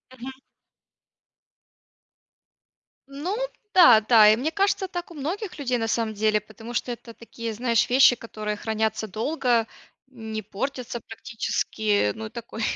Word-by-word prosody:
Мгм. 260 +2 -7 2.8
Ну 295 +8 -4 0.4
да 245 -12 +8
да, 215 -1 +6
и 215 - +6
мне 280 +8 -2
кажется, 395 +1 +1
так 350 -1 -6
у - - -9
многих 350 +7 -5
людей, 255 -3 0
на 225 -1 -2
самом 225 -1 -1
деле, 215 0 +1
потому 225 +3 -11
что 245 - -2
это 235 -1 -9
такие, 230 0 -7
знаешь, 230 0 +1
вещи, 255 0 +6
которые 215 -2 -5
хранятся 220 0 -2
долго, 235 - 0 0.4
не 220 -4 -6
портятся 240 +4 -5
практически, 220 -2 -1
ну, 220 - -6
и - - -12
такой 235 -1 -8
230 Hz, 135 wpm, -25 LUFS, 220-265 Hz, 2.8 s, да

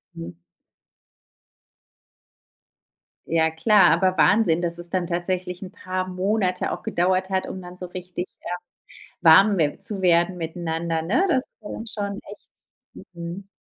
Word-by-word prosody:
Hm. 85 +1 -7 2.9
Ja 160 -1 +2
klar, 205 +5 +4
aber 185 -2 +2
Wahnsinn, 175 -2 +4
dass 170 -1 +2
es 175 0 -1
dann 185 0 -1
'n - - -8
tatsächlich 180 +1 -3
paar 185 -2 -4
Monate 185 0 0
auch - - -5
gedauert 185 +2 0
hat, 190 -1 -1
um 190 - -6
dann 180 0 -11
so 180 - -6
richtig, 180 0 -6
ähm, 175 - -4 0.6
warm 190 +5 +6
we 150 -3 0
zu 205 -3 +3
werden 175 0 +3
miteinander, 165 -1 -3
ne? 235 - +1
Das 265 -6 +1 0.2
war 210 - -8
dann 225 - -7
schon 200 -1 -4
echt 205 +1 -14 0.7
mhm. 170 +3 -7
180 Hz, 140 wpm, -23 LUFS, 170-195 Hz, 2.9 s, warm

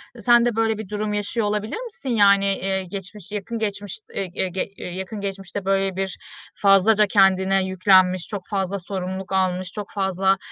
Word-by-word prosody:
E, 230 - -11
sen 240 +1 +5
de 240 -2 0
böyle 225 -1 +1
bir 215 -3 -7
durum 210 0 -2
yaşıyor 210 +1 0
olabilir 210 - -2
misin? 280 - -8
Yani, 200 -3 +5
eee, 195 -1 0
geçmiş 195 +1 -8
yakın 215 +3 -4
geçmiş 205 0 -3
e - - -2
e 185 0 -2
ge 185 +2 -3
yakın 190 +4 -6
geçmişte, 195 -1 -5
böyle, 195 -1 +1
bir 190 -1 -3 0.4
fazlaca 205 +2 +4
kendine 195 -1 +3
yüklenmiş, 185 -1 +3
çok 205 -3 -4
fazla 195 -1 -1
sorumluluk 190 0 -5
almış, 185 -1 0
çok 210 -1 -6
fazla 190 -1 +1
195 Hz, 170 wpm, -22 LUFS, 190-210 Hz, 0.4 s, sen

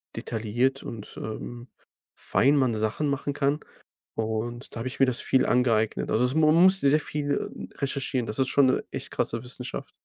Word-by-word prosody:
detailliert 120 +4 -1
und, 110 -3 -8
ähm, 120 +3 -6 0.5
fein 140 +2 +3
man 130 -4 +3
Sachen 110 +7 -1
machen 140 +1 -1
kann. 145 +1 +1 0.6
Und, 110 +3 -3
da 115 - -6
habe 125 - -3
ich 130 - -5
mir 135 - +8
das 125 -2 0
viel 130 - +2
angeeignet, 115 -3 +2
also, 115 - +3
es 125 +2 +1
man 155 0 +4
musste 185 -3 +5
sehr 150 +2 +3
viel 145 -1 -2 0.2
recherchieren. 135 -2 -1
Das 105 +2 -5
ist 130 - +3
schon 140 -1 +4
‘ne 130 - +2
echt - - -6
krasse 115 +2 -2
Wissenschaft. 125 0 -7
130 Hz, 180 wpm, -26 LUFS, 115-140 Hz, 0.6 s, mir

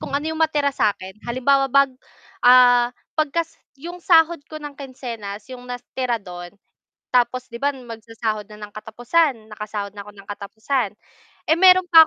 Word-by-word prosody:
kung - - -7
ano 290 - -3
'yong 320 0 -4
matira 295 -3 +2
sa 210 - +3
akin, 190 +1 -10
halimbawa 270 +3 +2
bag 275 0 +4 0.5
ah, 245 -1 +7 0.3
pagkas 320 +2 0 0.3
'yong 350 +1 -7
sahod 330 -1 +4
ko 310 - -7
ng 295 -1 -8
kinsenas, 230 -7 -7
'yong 250 -1 -9
natira 245 -1 -3
do'n 175 0 -9 0.6
tapos 250 +1 +2
'di 235 - -10
ba, 285 - +2
magsasahod 225 -3 -5
na 210 - -12
ng 210 0 -9
katapusan, 245 +3 0
nakasahod 210 -1 -5
na 200 - -7
ako 210 - -11
ng 200 -1 -15
katapusan, 220 +3 -2 0.6
eh, 320 - +4
mayro'n 370 0 +7
pa 325 -1 +9
245 Hz, 165 wpm, -22 LUFS, 215-285 Hz, 0.6 s, pa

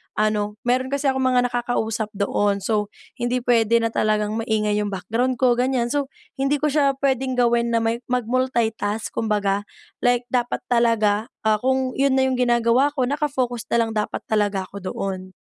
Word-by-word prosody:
ano, 210 -1 0
meron 255 +2 +1
kasi 280 0 0
akong 265 -1 0
mga 245 -1 +2
nakakausap 225 -2 -1
doon, 200 0 0
so 210 0 0 0.3
hindi 240 0 -1
pwede 230 -1 +3
na 230 - 0
talagang 215 -1 +1
maingay 215 -2 0
yung 210 - -1
background 225 +6 -1
ko, 245 -1 +2
ganyan. 250 -2 +1
So 285 -2 0 0.3
hindi 275 +2 +2
ko 295 0 0
siya 280 -2 +2
pwedeng 265 -1 +1
gawin 235 -1 +2
na 230 - +2
may 230 +1 0
mag-multitask, 235 -3 -1
kumbaga. 205 -2 -1 0.3
Like 245 0 +2
dapat 245 -1 -1
talaga, 225 -2 +2 0.2
ah, 215 -1 +2
kung 260 +1 0
iyon 275 -1 +3
na 265 - +3
yung 255 - -1
ginagawa 245 +3 +2
ko, 265 - +1
naka-focus 260 -4 -1
na - - +1
lang 225 - -4
dapat 210 -1 -3
talaga 205 -3 0
ako 200 +2 -9
doon. 185 -1 -5
235 Hz, 170 wpm, -22 LUFS, 215-255 Hz, 0.3 s, pwede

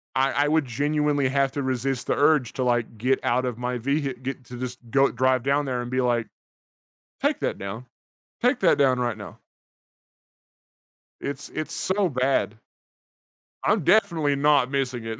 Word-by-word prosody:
I 135 +1 +2
I - - +1
would 155 -2 +2
genuinely 145 +2 0
have 135 -1 +1
to 140 - -2
resist 130 0 -2
the - - +1
urge 145 -5 +3
to, 130 - -2
like, 120 -2 0
get 130 +4 +1
out 125 +2 +1
of 120 -2 -3
my 125 0 -2
vehi 135 0 -2
get 135 0 -5
to 125 - -9
this 125 -1 -5
go 135 +3 +3
drive 130 0 +1
down 140 +1 +1
there 125 -2 -2
and 120 +1 -6
be, 130 0 +1
like, 120 -2 0 0.9
take - - +1
that - - -2
down. 110 +6 -6 0.6
Take 250 +3 +2
that 170 -6 +4
down 130 -3 +3
right 120 -3 -1
now. 105 - -10 1.8
It's 140 0 -5
it's 155 - -5
so 190 -1 0
bad. 130 -4 0 1.1
I'm - - +2
definitely 165 -9 +3
not 140 -2 +3
missing 125 -4 -2
it. 115 0 -5
130 Hz, 170 wpm, -25 LUFS, 125-145 Hz, 1.8 s, that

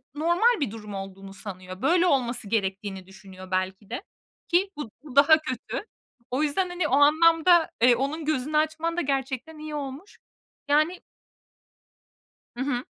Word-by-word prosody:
normal 345 +10 +3
bir 280 -9 -1
durum 210 -2 -9
olduğunu 195 0 -8
sanıyor. 185 -2 -8
Böyle 345 +6 +3
olması 245 - 0
gerektiğini 195 -2 -2
düşünüyor 190 -1 -13
belki 190 +2 -2
de, 245 +3 -5 0.4
ki 360 +3 +2
bu 265 -8 -6
bu 280 -4 -11
daha 295 +3 +7
kötü. 260 - -5 0.5
O 260 +4 +1
yüzden, 335 +5 0
hani, 355 -2 -1
o - - -6
anlamda, 330 +3 +5
eee, 245 0 +6
onun 285 +6 -2
gözünü 300 0 0
açman 315 +2 0
da - - +2
gerçekten 275 +2 -3
iyi 305 0 -6
olmuş. 285 +7 -7 0.5
Yani 310 +5 +2 1.5
Hı - - -6
hı. 255 -3 -2
280 Hz, 150 wpm, -26 LUFS, 210-315 Hz, 1.5 s, daha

